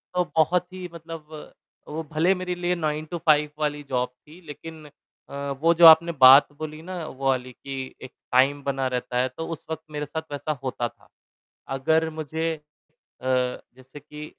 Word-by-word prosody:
तो 180 - +3
बहुत 170 +3 +3
ही 185 -1 -7
मतलब 165 -2 -9 0.6
वो 160 +2 -4
भले 165 +5 +3
मेरे 180 -1 -3
लिए 175 0 0
9 155 -2 -2
टू 175 - -2
5 150 -1 +5
वाली 150 -1 -1
जॉब 125 -1 0
थी 150 +7 -18
लेकिन 155 +1 -9 0.4
अ, 140 0 -4
वो 165 +1 +5
जो 170 0 +6
आपने 165 +1 +8
बात 135 +2 +10
बोली 155 0 -6
ना 175 -1 -6
वो 135 -2 -7
वाली 130 -1 -1
कि 135 +1 -7
एक 130 - -9 0.2
टाइम 140 +3 +3
बना 135 -1 -1
रहता 125 -1 -3
है, 125 +1 +2
तो 160 +6 -7
उस 165 -2 -7
वक़्त 160 0 -4
मेरे 150 0 -3
साथ 160 +3 -4
वैसा 145 +2 -3
होता 125 -2 -2
था। - - -26 0.7
अगर 160 +4 +2
मुझे 160 +1 -3
अ, 150 -1 -24 0.4
जैसे 130 +1 -3
कि 150 +1 -10
150 Hz, 180 wpm, -25 LUFS, 135-160 Hz, 0.7 s, बात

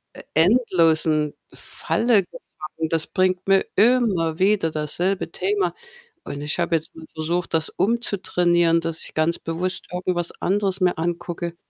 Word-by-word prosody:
e - - -10
endlosen 160 - +3 0.2
Falle 225 -4 +1
geraten. 160 -2 -8
Das 165 -1 0
bringt 185 -1 0
mir 195 0 +4
immer 200 -8 +2
wieder 190 -4 +2
dasselbe 170 +4 -1
Thema 405 0 -1 0.5
und 140 - -7
ich 150 +4 -3
habe 170 0 +1
jetzt 160 -1 -4
mal 160 - -11
versucht, 165 +2 -2
das 160 0 +2
umzutrainieren, 180 -6 +1
dass 165 -1 -2
ich - - -5
ganz 155 +2 0
bewusst 180 +3 -2
irgendwas 180 -1 -2
anderes 195 0 0
mir 180 -1 +2
angucke. 170 +1 -4
175 Hz, 140 wpm, -22 LUFS, 160-190 Hz, 0.5 s, mir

